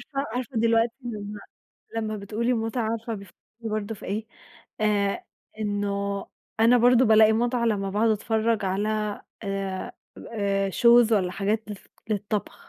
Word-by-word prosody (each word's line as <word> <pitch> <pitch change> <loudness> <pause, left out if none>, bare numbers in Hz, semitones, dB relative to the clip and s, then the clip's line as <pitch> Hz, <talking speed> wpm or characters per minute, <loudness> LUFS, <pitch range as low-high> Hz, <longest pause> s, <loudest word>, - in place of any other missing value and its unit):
عارفة، 275 +1 -1
عارفة 255 0 -3
دلوقتي 230 +1 +3
لما 210 -3 -6 0.6
لما 215 -1 -2
بتقولي 225 +5 -1
متعة 225 0 -1
عارفة 230 0 -3
بيف 200 -3 -8 0.3
برضه 215 -1 -3
في - - -11
إيه؟ 215 +3 -3 0.6
آآ، 205 -2 +1 0.4
إن 205 -1 -1 0.8
أنا 235 +2 +6
برضه 245 +1 +5
بلاقي 220 -1 +6
متعة 240 +1 +1
لما 200 -3 0
باقعد 215 +3 +2
أتفرج 220 0 +1
على 210 +2 -1 0.2
آآ، 195 -1 -3 0.4
آآ 200 -2 0
shows 235 +2 +6
والّا 185 -4 +2
حاجات 210 +3 -1
الف 205 -3 -9 0.2
للطبخ. 205 0 -2
215 Hz, 135 wpm, -26 LUFS, 205-230 Hz, 0.8 s, أنا